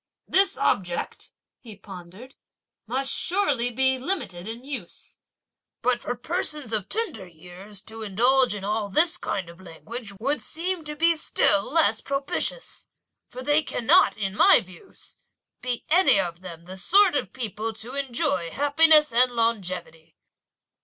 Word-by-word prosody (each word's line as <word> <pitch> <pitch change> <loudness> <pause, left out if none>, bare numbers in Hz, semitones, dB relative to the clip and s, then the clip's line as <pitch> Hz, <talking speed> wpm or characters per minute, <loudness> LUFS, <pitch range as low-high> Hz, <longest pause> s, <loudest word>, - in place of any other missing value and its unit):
"This 390 +1 +3
object," 175 -3 -2 0.3
he 220 -4 -12
pondered, 195 +5 -12 0.5
"must 265 +4 0
surely 295 -11 +1
be 260 +2 +1
limited 230 - -3
in 230 +2 -7
use! 260 -10 -9 0.7
But 245 -1 +1
for 245 - -4
persons 300 -2 -2
of 210 -3 -1
tender 415 - -3
years 180 +4 -9
to 225 +1 -3
indulge 240 +4 +3
in 200 - -7
all 210 0 -2
this 325 - +4
kind 190 -4 -3
of 170 +2 -14
language, 200 +6 -8
would 280 +6 0
seem 345 +1 -4
to 300 0 -6
be 335 +2 +3
still 205 -10 +1
less 325 0 +3
propitious; 280 - -2 0.4
for 255 +1 -9
they 295 +3 +2
cannot, 310 +5 +3
in 195 -3 -3
my - - +6
views, 185 -5 -15 0.4
be 250 -1 -3
any 345 - +4
of 170 -2 -3
them 170 -3 -9
the 185 +2 -9
sort 370 - +4
of - - -2
people 225 -2 -4
to 225 +4 -9
enjoy 240 -10 -1
happiness 300 - +4
and 250 +2 +4
longevity!" 185 -8 -3
235 Hz, 145 wpm, -24 LUFS, 195-290 Hz, 0.7 s, my